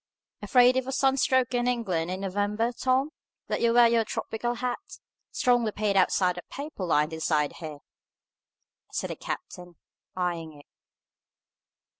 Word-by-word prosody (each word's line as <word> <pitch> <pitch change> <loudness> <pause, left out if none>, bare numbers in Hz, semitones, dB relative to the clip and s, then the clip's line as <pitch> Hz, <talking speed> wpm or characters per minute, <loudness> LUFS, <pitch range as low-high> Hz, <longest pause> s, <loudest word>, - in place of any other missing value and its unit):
"Afraid 250 0 +5
of 260 0 -1
a - - -2
sun 270 0 +2
stroke 260 -2 +2
in 245 0 +1
England 190 -9 -1
in 185 +1 -4
November, 205 +4 -1
Tom, 260 +4 0 0.3
that - - -2
you 235 - +3
wear 240 0 +7
your 230 -1 +3
tropical 240 +2 -3
hat, 250 0 -2 0.5
strongly 240 -3 +2
paid 205 -1 -1
outside 180 -1 +2
and - - -14
paper 285 -8 -6
lined 155 -1 +1
inside, 155 -2 0
here?" 155 -3 -7 1.1
said - - -3
the - - -4
captain, 175 -1 -7 0.4
eyeing 170 -3 -2
it. 145 -1 -16
220 Hz, 145 wpm, -27 LUFS, 180-245 Hz, 1.1 s, wear